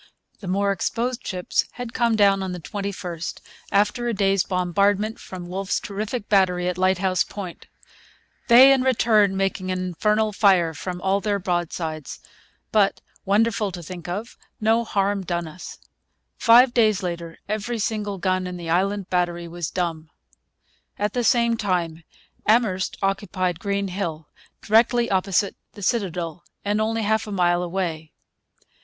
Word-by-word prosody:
The 195 Hz, -, -8 dB
more 200 Hz, +2 st, +1 dB
exposed 235 Hz, +5 st, -2 dB
ships 180 Hz, -2 st, 0 dB
had 245 Hz, -2 st, -7 dB
come 235 Hz, -2 st, +2 dB
down 200 Hz, -2 st, +4 dB
on 190 Hz, -1 st, -3 dB
the 180 Hz, -, -5 dB
21st, 180 Hz, -2 st, -5 dB, 0.3 s
after 210 Hz, +4 st, +2 dB
a 235 Hz, -, -1 dB
day's 195 Hz, -1 st, +2 dB
bombardment 200 Hz, +4 st, +1 dB
from 180 Hz, -2 st, -8 dB
Wolfe's 190 Hz, +2 st, -2 dB
terrific 210 Hz, +2 st, -4 dB
battery 180 Hz, -3 st, +2 dB
at 180 Hz, 0 st, -2 dB
Lighthouse 185 Hz, 0 st, +2 dB
Point: 190 Hz, -4 st, -8 dB, 0.8 s
'they 260 Hz, +3 st, +9 dB
in 265 Hz, -, +2 dB
return 220 Hz, -6 st, +3 dB
making 195 Hz, -1 st, -1 dB
an 185 Hz, -1 st, -2 dB
Infernall 215 Hz, +4 st, +1 dB
Fire 185 Hz, -6 st, +4 dB
from 180 Hz, +2 st, -6 dB
all 195 Hz, +1 st, +1 dB
their 205 Hz, -1 st, 0 dB
Broadsides; 175 Hz, -4 st, -3 dB, 0.5 s
but, 205 Hz, -2 st, +3 dB, 0.3 s
wonderfull 210 Hz, 0 st, +2 dB
to 175 Hz, -1 st, -7 dB
think 175 Hz, +1 st, -8 dB
of, 205 Hz, +7 st, -5 dB, 0.2 s
no 225 Hz, +2 st, +2 dB
harm 200 Hz, -2 st, 0 dB
done 170 Hz, -2 st, -2 dB
us.' 175 Hz, +3 st, -9 dB, 0.6 s
Five 240 Hz, +2 st, +6 dB
days 215 Hz, -5 st, +3 dB
later 170 Hz, -2 st, -5 dB
every 215 Hz, +3 st, -2 dB
single 210 Hz, -2 st, -2 dB
gun 185 Hz, 0 st, 0 dB
in 180 Hz, 0 st, -6 dB
the 170 Hz, -2 st, -5 dB
Island 195 Hz, +2 st, +1 dB
Battery 175 Hz, -1 st, 0 dB
was 170 Hz, -2 st, -4 dB
dumb. 165 Hz, -3 st, -3 dB, 0.9 s
At 205 Hz, 0 st, -1 dB
the 245 Hz, -, 0 dB
same 235 Hz, 0 st, +3 dB
time 170 Hz, -5 st, -1 dB, 0.4 s
Amherst 215 Hz, -4 st, +2 dB
occupied 185 Hz, -3 st, -1 dB
Green 200 Hz, 0 st, -1 dB
Hill, 165 Hz, -5 st, -4 dB, 0.4 s
directly 235 Hz, +2 st, +3 dB
opposite 195 Hz, +1 st, +1 dB, 0.2 s
the 205 Hz, -, -10 dB
citadel 180 Hz, -6 st, -2 dB, 0.2 s
and 205 Hz, +1 st, +1 dB
only 225 Hz, +1 st, 0 dB
half 220 Hz, +1 st, +1 dB
a -, -, -6 dB
mile 175 Hz, -2 st, +2 dB
away. 170 Hz, -3 st, -3 dB
195 Hz, 150 wpm, -23 LUFS, 180-215 Hz, 0.9 s, they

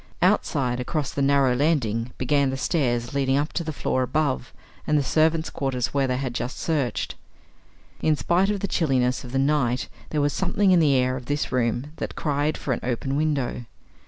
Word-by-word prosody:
Outside, 125 Hz, -2 st, +2 dB
across 145 Hz, +2 st, -2 dB
the 140 Hz, -, -2 dB
narrow 135 Hz, -2 st, +3 dB
landing, 125 Hz, -5 st, 0 dB
began 140 Hz, +1 st, +2 dB
the 135 Hz, -, -3 dB
stairs 125 Hz, -4 st, 0 dB
leading 135 Hz, -1 st, +1 dB
up 145 Hz, +2 st, -1 dB
to 170 Hz, -, -1 dB
the 160 Hz, -, -3 dB
floor 130 Hz, -3 st, -1 dB
above, 135 Hz, -1 st, -1 dB, 0.4 s
and 150 Hz, -, +3 dB
the 145 Hz, -, +2 dB
servants' 160 Hz, +3 st, +2 dB
quarters 130 Hz, -3 st, -2 dB
where 140 Hz, -1 st, +2 dB
they 125 Hz, 0 st, 0 dB
had 130 Hz, -2 st, -3 dB
just 120 Hz, +1 st, -4 dB
searched. 145 Hz, -7 st, -1 dB, 0.9 s
In 155 Hz, -, +3 dB
spite 175 Hz, +8 st, +2 dB
of 205 Hz, -2 st, -1 dB
the 200 Hz, -, 0 dB
chilliness 130 Hz, -8 st, +1 dB
of 125 Hz, -, -9 dB
the 135 Hz, -, -1 dB
night 135 Hz, -3 st, +1 dB, 0.2 s
there 150 Hz, -, -1 dB
was 145 Hz, 0 st, +1 dB
something 190 Hz, +1 st, +2 dB
in 180 Hz, -, +6 dB
the 145 Hz, -4 st, +4 dB
air 130 Hz, 0 st, +2 dB
of 125 Hz, -, -10 dB
this 145 Hz, +1 st, -1 dB
room 125 Hz, +3 st, 0 dB
that -, -, -5 dB
cried 145 Hz, 0 st, 0 dB
for 130 Hz, -, -2 dB
an -, -, -3 dB
open 130 Hz, +2 st, -2 dB
window. 140 Hz, -5 st, -1 dB
140 Hz, 195 wpm, -24 LUFS, 125-150 Hz, 0.9 s, in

